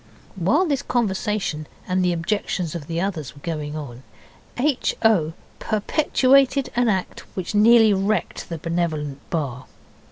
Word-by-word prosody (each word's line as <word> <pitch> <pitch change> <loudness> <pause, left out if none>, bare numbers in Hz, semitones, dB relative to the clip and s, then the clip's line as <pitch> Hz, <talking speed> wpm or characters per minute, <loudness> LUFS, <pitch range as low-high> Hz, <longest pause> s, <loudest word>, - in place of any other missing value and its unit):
While 220 - +2
this 285 -6 0
conversation 210 - -1 0.2
and 185 0 +1
the 180 - +2
objections 175 -1 -2
of 160 -4 -6
the 165 0 -2
others 170 -7 -3
were 140 - -15
going 155 -2 -4
on, 130 -5 -7 0.6
H. 275 +1 +1
O. 175 -8 +3 0.3
perpetuated 270 +4 +2
an 245 0 +3
act 190 -3 -1 0.2
which 185 0 -4
nearly 220 0 +6
wrecked 200 +3 -1
the 165 - -4
Benevolent 155 -4 -2
Bar. 135 -7 -3
185 Hz, 135 wpm, -23 LUFS, 155-225 Hz, 0.6 s, nearly